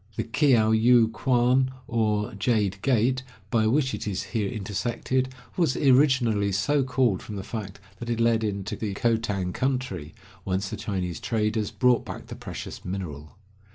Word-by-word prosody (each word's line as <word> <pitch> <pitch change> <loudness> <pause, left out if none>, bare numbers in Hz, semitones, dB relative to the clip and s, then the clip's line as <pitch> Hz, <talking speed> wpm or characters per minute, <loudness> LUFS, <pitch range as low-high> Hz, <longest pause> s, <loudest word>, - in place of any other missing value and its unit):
The - - -1
Kiayu 115 -3 +4
kuan, 130 0 +2 0.2
or 105 -3 0
"Jade 100 -2 0
Gate," 130 +1 +2 0.3
by 110 -2 +3
which 130 +3 +2
it - - -4
is 95 -2 -2
here 105 -4 0
intersected, 115 +6 -2 0.3
was 165 -7 +1
originally 130 -7 +3
so 140 +9 +2
called 125 -6 +1
from 105 - -8
the 95 - -5
fact 100 -4 -6 0.2
that 120 - -6
it 115 -1 -1
led 115 -1 +3
into 100 -2 -3
the 105 -3 -4
Khotan 105 -5 0
country, 125 - -2 0.3
whence 95 +1 -1
the - - -4
Chinese 90 -4 -3
traders 110 -2 -1
brought 125 -2 +2
back - - -8
the - - -8
precious - - -7
mineral. 85 -6 -6
110 Hz, 155 wpm, -26 LUFS, 100-125 Hz, 0.3 s, Kiayu